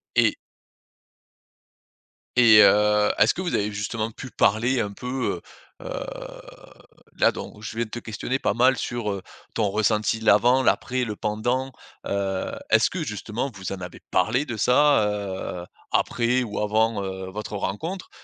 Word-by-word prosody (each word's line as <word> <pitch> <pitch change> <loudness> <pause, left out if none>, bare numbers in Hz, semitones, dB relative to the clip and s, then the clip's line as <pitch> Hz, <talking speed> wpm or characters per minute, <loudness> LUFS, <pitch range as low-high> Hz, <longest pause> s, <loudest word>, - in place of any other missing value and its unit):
Et - - +4 2.0
et 115 -4 +8
heu, 105 0 +4
est-ce 110 +2 +5
que - - -5
vous 175 - -2
avez 105 +1 0
justement 110 +2 -3
pu 130 +3 -9
parler 120 +5 +2
un 100 - -3
peu, 125 +5 -3 0.4
heu - - -11
heu, - - -4 1.2
là - - +5
donc, 105 - -9
je 110 - -7
viens 115 +1 -1
de - - -15
te 120 - -4
questionner 120 +4 -3
pas - - 0
mal 130 +3 +4
sur, 120 -4 -3
heu, 100 -1 -4 0.3
ton 105 -3 +1
ressenti, 110 +2 +1
l'avant, 120 +4 +4
l'après, 130 0 +1
le 110 -3 -3
pendant, 120 +6 -1 0.4
heu, 95 -1 -2 0.2
est-ce 110 0 +5
que, 180 -3 -3
justement, 110 +2 -4
vous 95 -2 -6
en 95 -2 -5
avez 90 -1 -8
parlé 115 +10 +1
de 120 -6 -5
ça, 125 +1 +4 0.6
heu, - - -9 0.3
après 125 +1 +1
ou 105 -3 -4
avant, 110 0 +1
heu, 95 -1 -5
votre 105 +2 -6
rencontre? 165 - -4
110 Hz, 160 wpm, -24 LUFS, 105-125 Hz, 2.0 s, et